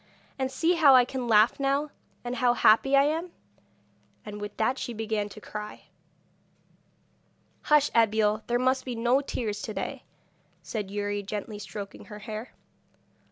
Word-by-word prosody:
And 260 0 0
see 325 +6 +2
how 300 -6 +6
I 250 -1 +6
can 255 -1 -4
laugh 220 +3 +4
now, 280 +2 0 0.3
and 245 +1 -4
how 245 -1 +3
happy 270 +6 +4
I 275 - +6
am!' 325 +4 -1 0.9
And 210 -1 -7
with 205 0 -7
that 250 +4 0
she 240 - -4
began 215 -2 -2
to 215 - -11
cry. 210 0 -8 1.8
'Hush, 300 -1 +4
Abeille! 215 -1 +3
there 240 - +1
must 260 +1 +1
be 250 -2 -5
no 240 +4 +2
tears 215 -6 -4
to 215 - -6
day,' - - -4 0.6
said 210 -4 -4
Youri, 205 0 -2
gently 205 +1 -6
stroking 205 -1 -8
her 210 - -10
hair. 215 +2 -7
230 Hz, 155 wpm, -27 LUFS, 210-265 Hz, 1.8 s, how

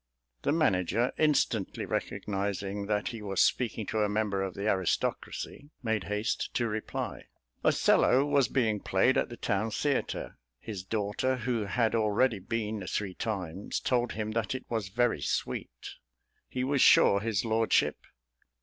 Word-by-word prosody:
The - - +1
manager, 115 - +2
instantly 145 -9 +1
recognising 100 0 -3
that 105 -1 0
he 115 -2 -7
was 100 -2 -3
speaking 115 -3 +2
to 110 - -2
a 105 - +2
member 105 -2 0
of 95 -1 -3
the 100 +2 -3
aristocracy, 100 - -1
made 110 -4 0
haste 105 +2 -1
to 120 - +1
reply. 110 0 -4 0.4
"Othello" 135 +3 +4
was 140 -4 +3
being 110 -5 +1
played 95 +7 +2
at - - +1
the 120 - -8
town 100 +3 0
theatre. 130 - -2 0.2
His 105 -5 -6
daughter, 105 +5 -1
who 120 -3 -1
had 110 +3 +1
already 110 +1 +2
been 105 +1 -3
three 100 -3 -2
times, 95 -3 -3
told 120 -1 0
him 110 0 -3
that 115 +1 -1
it 130 - -6
was 110 -5 -2
very 120 +5 +1
sweet. - - -3 0.6
He 125 - -2
was 135 0 +1
sure 100 - +6
his 110 0 -1
lordship.... 115 0 +2
110 Hz, 150 wpm, -29 LUFS, 100-120 Hz, 0.6 s, sure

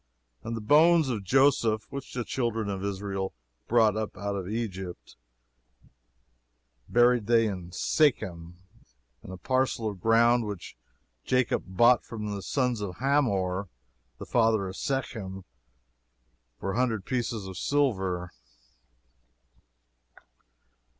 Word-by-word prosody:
"And 115 0 -4
the - - -5
bones 155 +5 +5
of 110 -5 -2
Joseph, 115 -2 +3
which 140 -1 -7
the 125 - -1
children 115 -4 -2
of 95 -1 -4
Israel 95 -2 -3 0.3
brought 110 -3 +4
up 110 -1 -4
out 100 -1 -3
of 95 -1 -4
Egypt, 95 - -5 1.7
buried 120 -2 +4
they 115 -1 +4
in 90 -5 -4
Shechem, 90 - 0 0.7
in - - -11
a 95 - -7
parcel 130 +2 0
of 100 -4 -6
ground 115 +1 +4
which 100 -4 -7 0.5
Jacob 125 -1 +1
bought 120 +6 +4
of 105 -2 -4
the 100 -1 -4
sons 125 -1 -1
of 95 -3 -4
Hamor 100 -9 0 0.5
the - - -8
father 110 -4 +2
of 95 - -7
Shechem 105 -9 -4 1.2
for 95 - -3
a 100 - -3
hundred 115 -6 0
pieces 115 -5 -2
of 95 -1 -7
silver." 95 -9 0
110 Hz, 120 wpm, -28 LUFS, 95-120 Hz, 1.7 s, bones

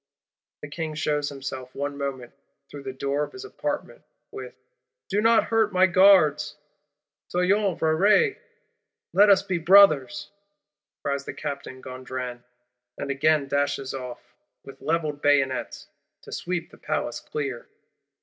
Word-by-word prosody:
The - - -5
King 155 +1 -5
shews 150 -1 -1
himself, 130 -2 -7
one 145 0 -3
moment, 135 -4 -5 0.4
through 145 - -8
the 135 -1 -5
door 140 +2 -2
of - - -7
his 390 +1 -8
Apartment, - - -5 0.3
with: - - -8 0.5
'Do 205 +2 +1
not 225 +1 +5
hurt 225 -2 +1
my 185 0 +5
Guards!'—'Soyons 175 +2 +1
frères, 200 - +3 0.8
Let 205 +1 +6
us 195 -1 +5
be 185 -3 -2
brothers!' 195 +1 +5 0.7
cries 140 0 -2
Captain 140 -3 -6
Gondran; 130 -1 -6 0.5
and 140 - -3
again 150 +1 +2
dashes 140 -1 -1
off, 125 -2 -8 0.3
with 135 - -13
levelled 155 -3 -1
bayonets, 135 -2 +1 0.4
to - - -12
sweep 175 -1 -4
the - - -17
Palace 150 -6 -2
clear. 135 -5 -5
150 Hz, 125 wpm, -25 LUFS, 140-185 Hz, 0.8 s, Let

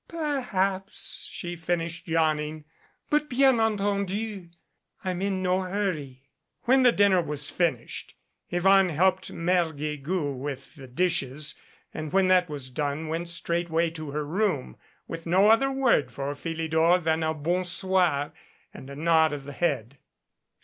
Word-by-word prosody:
"Perhaps," 215 - -2
she 175 -1 -5
finished, 165 0 -3
yawning. 155 -2 0 0.5
"But, 300 0 +2
bien 265 -1 +4
entendu, 205 -2 -1 0.5
I'm 185 -1 -2
in 195 -1 -1
no 185 +1 +2
hurry." 180 -9 -3 0.4
When 260 +2 +4
the 250 -1 +6
dinner 200 -4 +4
was 150 -2 -3
finished, 160 -10 -2 0.3
Yvonne 190 +2 +4
helped 185 +4 +1
Mere 175 +1 +2
Guegou 150 +1 -3
with 135 +1 -6
the 135 -4 -11
dishes, 150 -1 -1 0.4
and 155 -1 -5
when 190 -1 +3
that 180 -2 +4
was 140 -3 -5
done 145 +3 -2
went 165 +2 -3
straightway 170 -1 0
to 155 -2 -7
her 150 +1 -3
room, 175 - -1 0.3
with 165 0 -7
no 190 +5 +5
other 270 +5 +4
word 245 - +2
for 140 +2 -3
Philidor 160 +2 +1
than 160 -2 0
a 160 0 0
"Bon 175 +5 0
soir," 180 -5 +1 0.4
and 130 - -10
a 140 - -8
nod 160 0 +3
of 145 -2 -5
the 145 +1 -8
head. 135 -5 -1
170 Hz, 145 wpm, -27 LUFS, 150-190 Hz, 0.5 s, the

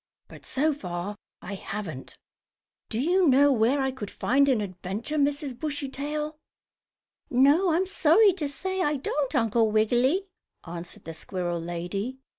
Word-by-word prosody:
But, - - -13
so 300 +3 +1
far, 180 -5 -5 0.3
I 190 - -6
haven't. 190 -8 -6 0.7
Do 220 - -2
you 350 +6 +3
know 280 +1 +6
where 245 +3 +3
I 265 -1 +1
could 220 -6 -7
find 280 +3 +2
an 255 -4 +3
adventure, 200 - -4
Mrs. 285 -2 0
Bushytail?" 300 +1 -4 0.9
"No, 285 +9 +4
I'm 345 +4 +2
sorry 380 +2 +5
to 310 -6 -3
say 375 +6 -3
I 295 -4 +1
don't, 280 +1 -2
Uncle 225 -2 +3
Wiggily," 245 - +2 0.4
answered 170 0 -8
the 165 - -7
squirrel 175 +1 -3
lady. 180 +9 -4
265 Hz, 140 wpm, -27 LUFS, 205-300 Hz, 0.9 s, know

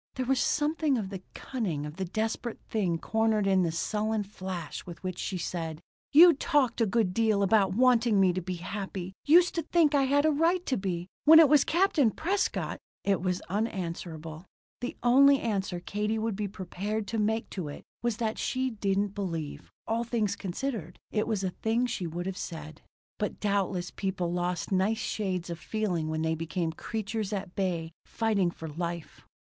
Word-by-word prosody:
There 260 - -2
was 265 +1 +2
something 305 -2 +1
of 205 -4 -3
the 190 -2 -6
cunning 185 - -3
of 150 +3 -8
the 190 - -2
desperate 220 +5 -3
thing 185 -6 0
cornered 220 +2 +1
in 190 -1 +4
the 170 -2 +1
sullen 215 +5 -1
flash 185 -5 -6
with 175 +1 -10
which 185 -1 -4
she 190 - -2
said: 165 -2 -4 0.3
"You 335 +4 +9
talked 275 -5 +1
a 225 - +4
good 205 -3 +1
deal 215 -2 +2
about 195 -1 +3
wanting 240 -3 +4
me 185 -2 +4
to 185 - -2
be 180 +1 -4
happy. 190 0 -5
Used 345 +4 +6
to 335 - 0
think 320 -1 +3
I 275 -2 +4
had 285 +2 +3
a 315 - +5
right 335 +4 +2
to 260 - +1
be. 180 -4 -2 0.2
When 320 +2 +10
it 320 -2 +9
was 290 -1 +5
Captain 330 - +3
Prescott 375 - -1 0.2
" - - -74
It 185 - -1
was 180 -1 -1
unanswerable. 170 -5 -4 0.3
The 245 - -5
only 275 +3 +6
answer 195 -5 -2
Katie 210 +4 -2
would 220 -1 -1
be 210 0 -2
prepared 200 +3 -4
to 225 - -1
make 220 +2 0
to 180 -6 -4
it 145 - -8 0.2
was 240 -3 -1
that 225 -2 -2
she 260 0 -1
didn't 200 -2 0
believe, 165 -7 -4 0.2
all 230 +1 0
things 225 -4 0
considered, 195 - -4
it 215 - 0
was 215 -4 -1
a 185 - 0
thing 225 +6 0
she 195 -7 -3
would 175 +2 -4
have 190 0 -4
said. 155 -2 -7 0.4
But 210 - -2
doubtless 195 -3 0
people 185 -3 -2
lost 175 +1 -2
nice 195 +4 +2
shades 185 -6 -2
of 170 - -5
feeling 180 -8 -2
when 155 0 -1
they 160 0 +1
became 165 +1 -2
creatures 215 +3 -4
at 195 -3 -4
bay 170 -4 -1
fighting 215 -6 +1
for 165 -1 -8
life. 170 +1 -5
200 Hz, 190 wpm, -29 LUFS, 180-230 Hz, 0.4 s, When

